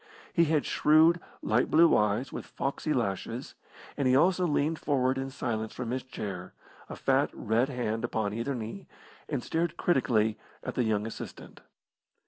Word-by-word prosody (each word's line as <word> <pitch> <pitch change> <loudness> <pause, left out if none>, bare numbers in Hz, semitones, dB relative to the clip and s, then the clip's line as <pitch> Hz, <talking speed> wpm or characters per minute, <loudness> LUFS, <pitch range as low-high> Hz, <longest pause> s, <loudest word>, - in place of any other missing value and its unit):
He 170 - +4
had 155 -2 +1
shrewd, 160 +3 +5 0.2
light 110 +4 +2
blue 165 +1 +6
eyes 105 +5 +1
with - - -6
foxy 140 +3 -3
lashes, 115 0 -2 0.4
and 140 -2 0
he 130 - +4
also 180 +4 +4
leaned 155 +1 0
forward 135 -2 +1
in 135 0 -3
silence 110 -4 -3
from 120 -2 -4
his 130 +1 -1
chair, 95 -7 -7 0.3
a - - -6
fat, - - +2
red 115 +5 +1
hand 120 -4 -2
upon 110 -3 -1
either 115 +5 -2
knee, 115 - -6 0.4
and 140 -5 -2
stared 165 0 -1
critically 110 -8 +2 0.2
at - - -4
the 125 - 0
young 105 -1 +1
assistant. 115 - -8
130 Hz, 160 wpm, -29 LUFS, 110-150 Hz, 0.4 s, blue